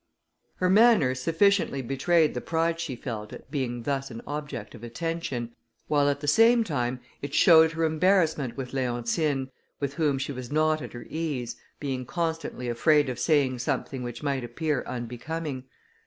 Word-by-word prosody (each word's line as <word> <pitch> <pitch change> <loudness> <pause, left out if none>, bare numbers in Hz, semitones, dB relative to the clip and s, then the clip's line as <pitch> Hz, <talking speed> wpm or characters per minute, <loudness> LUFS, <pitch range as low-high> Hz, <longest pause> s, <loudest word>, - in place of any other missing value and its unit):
Her 185 - 0
manner 200 - +5
sufficiently 165 +1 +2
betrayed 150 +5 +2
the 125 - -3
pride 165 0 0
she 165 -6 -3
felt, 110 -4 -6
at - - -12
being 120 -5 -2
thus 135 +1 -2
an 115 -1 -8
object 145 -8 -5
of 120 -2 -12
attention, 125 -2 -4 0.3
while 145 -1 +3
at 145 0 -1
the 145 - -4
same 230 +9 +5
time 130 - -2 0.2
it 140 0 -4
showed 160 -1 +7
her 165 0 -1
embarrassment 160 -5 +2
with 130 -1 -5
Leontine, 130 +2 -1 0.3
with 140 -1 -2
whom 145 -2 +1
she 135 +2 -3
was 130 -2 -7
not 155 +1 +2
at - - -8
her 120 - -8
ease, 145 -7 -3 0.2
being 130 -3 -3
constantly 160 -7 -3
afraid 145 +4 +3
of 125 -1 -4
saying 135 -4 +2
something 130 +1 -2
which 120 0 -6
might 140 -3 -1
appear 140 +3 -2
unbecoming. 130 +4 -5
140 Hz, 165 wpm, -27 LUFS, 125-160 Hz, 0.3 s, showed